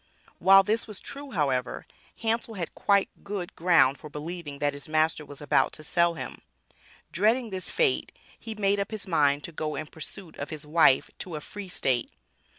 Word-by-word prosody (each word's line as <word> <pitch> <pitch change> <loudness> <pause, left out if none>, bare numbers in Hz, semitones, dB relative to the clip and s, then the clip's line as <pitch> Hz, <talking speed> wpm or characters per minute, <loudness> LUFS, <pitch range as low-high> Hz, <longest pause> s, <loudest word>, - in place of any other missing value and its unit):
While 195 +2 +8
this 220 +4 0
was 215 -3 -6
true, 285 0 -6
however, 135 - -1 0.4
Hansel 225 0 0
had 175 -4 -4
quite 200 -1 +2
good 200 -3 -5
ground 165 -6 +4
for 150 - -9
believing 150 0 -6
that 145 0 0
his 140 +1 -7
master 155 0 +2
was 145 -1 -11
about 145 - +2
to 155 - -7
sell 170 +2 +2
him. - - -7 0.7
Dreading 225 +5 +2
this 185 -1 -3
fate 460 -6 +1 0.3
he 225 -1 -6
made 200 -1 +2
up 200 - -1
his 215 -3 -4
mind 145 -5 +2
to - - -5
go 155 -1 -3
in 155 - -4
pursuit 160 +3 -7
of 140 - -5
his 150 -1 -6
wife 150 -3 +4
to 175 -4 -5
a - - -3
Free 200 +5 -8
state. 130 -8 +1
170 Hz, 185 wpm, -27 LUFS, 150-200 Hz, 0.7 s, While